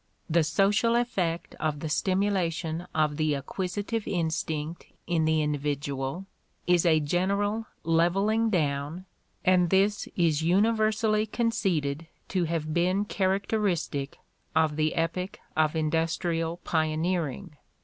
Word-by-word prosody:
The 165 0 +3
social 200 +8 +2
effect 190 -9 -1
of 150 -2 -1
the 160 - -4
stimxdation 180 -2 0
of 150 -2 +1
the 155 -2 +1
acquisitive 195 - -3
instinct 160 -2 -2 0.2
in 165 -2 +1
the 160 -1 +2
individual 145 +2 -2 0.4
is 175 0 +3
a 160 -2 +5
general 200 +8 0 0.2
"levelling 195 +8 +2
down," 150 -1 -1 0.4
and 180 -2 +4
this 200 +3 +2
is 160 -4 +2
universally 215 +4 +2
conceded 180 -10 -1 0.2
to 185 -3 +1
have 160 -2 -2
been 185 +4 +2
characteristic 190 -7 -1 0.4
of 160 -1 +3
the 155 0 0
epoch 180 +3 -2 0.2
of 155 0 +2
industrial 165 +1 0
pioneering. 160 -2 -1
170 Hz, 110 wpm, -27 LUFS, 155-195 Hz, 0.4 s, a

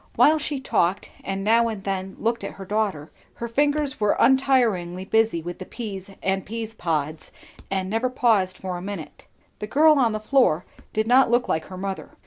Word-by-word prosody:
While 310 +1 +5
she 295 -1 -3
talked 190 -7 0
and 195 0 -3
now 230 +3 +4
and 215 -4 -5
then 190 -1 -3
looked 230 -1 -1
at 200 - -5
her 195 - -9
daughter, 195 -7 -2 0.2
her 235 - -5
fingers 290 +2 0
were 210 -1 +2
untiringly 230 -9 +2
busy 220 -6 +1
with 175 +1 -6
the 185 - -6
peas 200 -5 -7
and 190 0 0
peas 225 +1 -5
pods 155 -5 -3 0.4
and 190 -1 -1
never 225 +5 0
paused 220 -7 +2
for 185 -1 -4
a - - -7
minute. 195 -4 -8 0.3
The 210 - -5
girl 300 +5 +5
on 235 -4 +3
the 215 - -2
floor 215 - +2 0.3
did 215 0 0
not 250 +3 +5
look 240 +1 +2
like 160 0 -1
her 185 - -9
mother. 195 0 -5
210 Hz, 190 wpm, -24 LUFS, 185-240 Hz, 0.4 s, While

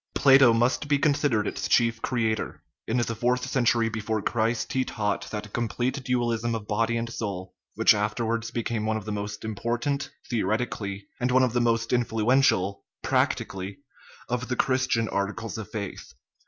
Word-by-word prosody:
Plato 135 -3 +7
must 120 +5 +1
be 145 -1 +3
considered 140 -6 +2
its - - -3
chief 115 -1 +2
creator: 115 -3 -1 0.2
in 115 - 0
the 120 -1 0
fourth 125 +3 0
century 120 -3 +2
before 110 0 -2
Christ 115 +2 -1
he 130 - +2
taught 105 -4 -2
that 105 -1 -6
complete 120 +4 -1
dualism 120 -2 0
of 105 -2 -6
body 115 +2 +1
and 115 0 -2
soul 100 -6 -5 0.2
which - - +6
afterwards 115 +2 -1
became 115 -2 -2
one 110 0 +1
of 105 - -7
the 110 - -4
most 105 +1 -4
im 110 - -3
portant, 120 +6 -2 0.2
theoretically, 105 -3 -2
and 125 - +1
one 130 +1 +4
of 125 -3 +1
the 120 - +2
most 115 0 +1
influential, 115 -4 +2 0.2
practically, 95 0 0 0.5
of 125 +1 -2
the 125 - -1
Christian 130 -4 +1
articles 105 +3 -3
of 105 -1 -7
faith. 100 - -6
115 Hz, 165 wpm, -26 LUFS, 105-125 Hz, 0.5 s, Plato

